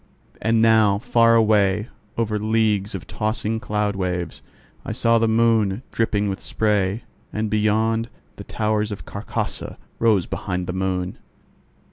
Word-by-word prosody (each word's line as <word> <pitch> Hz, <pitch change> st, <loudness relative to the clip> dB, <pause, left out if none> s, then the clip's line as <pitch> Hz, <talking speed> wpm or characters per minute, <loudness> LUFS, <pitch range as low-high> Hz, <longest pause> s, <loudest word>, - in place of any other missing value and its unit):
And 115 Hz, 0 st, +2 dB
now, 110 Hz, -3 st, +5 dB
far 115 Hz, 0 st, +3 dB
away, 105 Hz, -2 st, +3 dB, 0.3 s
over 110 Hz, -2 st, 0 dB
leagues 105 Hz, -2 st, +1 dB
of 90 Hz, -, -6 dB
tossing 110 Hz, +1 st, -2 dB
cloud 105 Hz, -2 st, -1 dB
waves, 90 Hz, -3 st, -3 dB, 0.4 s
I -, -, -4 dB
saw 115 Hz, 0 st, +3 dB
the 115 Hz, -, +2 dB
moon 110 Hz, -1 st, +2 dB
dripping 105 Hz, -2 st, 0 dB
with 95 Hz, 0 st, -3 dB
spray; 105 Hz, 0 st, 0 dB, 0.3 s
and 110 Hz, -1 st, -2 dB
beyond, 110 Hz, +2 st, +1 dB, 0.3 s
the -, -, -7 dB
towers 110 Hz, 0 st, -1 dB
of 100 Hz, -, -7 dB
Carcosa 100 Hz, +2 st, -4 dB, 0.2 s
rose 105 Hz, -6 st, +3 dB
behind 90 Hz, 0 st, -3 dB
the 90 Hz, -, -4 dB
moon. 95 Hz, -1 st, -2 dB
105 Hz, 135 wpm, -22 LUFS, 100-110 Hz, 0.4 s, now